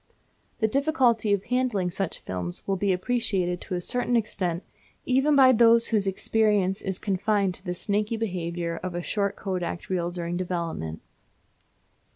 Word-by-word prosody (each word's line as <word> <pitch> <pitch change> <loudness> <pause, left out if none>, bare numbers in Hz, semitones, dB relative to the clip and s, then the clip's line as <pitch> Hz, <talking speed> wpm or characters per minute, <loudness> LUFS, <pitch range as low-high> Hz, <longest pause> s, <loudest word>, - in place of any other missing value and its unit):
The 220 - +4
difficulty 250 -4 +2
of 200 -1 +2
handling 240 -7 0
such 195 0 -3
films 90 -1 -4
will 195 - +1
be 195 +1 +1
appreciated 185 -3 0
to 185 - -4
a 175 - -2
certain 245 +5 0
extent 185 -6 -1 0.4
even 270 +3 +3
by 265 -2 +7
those 230 -1 +5
whose 210 -3 +1
experience 200 0 +1
is 190 -2 -2
confined 200 -1 0
to 180 - -16
the 180 -2 -3
snaky 210 +4 -1
behaviour 175 -5 -3
of 185 -1 -4
a 175 - -3
short 200 +1 -1
Kodak 180 -3 -4
reel 175 -2 0
during 175 0 -4
development. 170 - -3
195 Hz, 155 wpm, -26 LUFS, 175-225 Hz, 0.4 s, by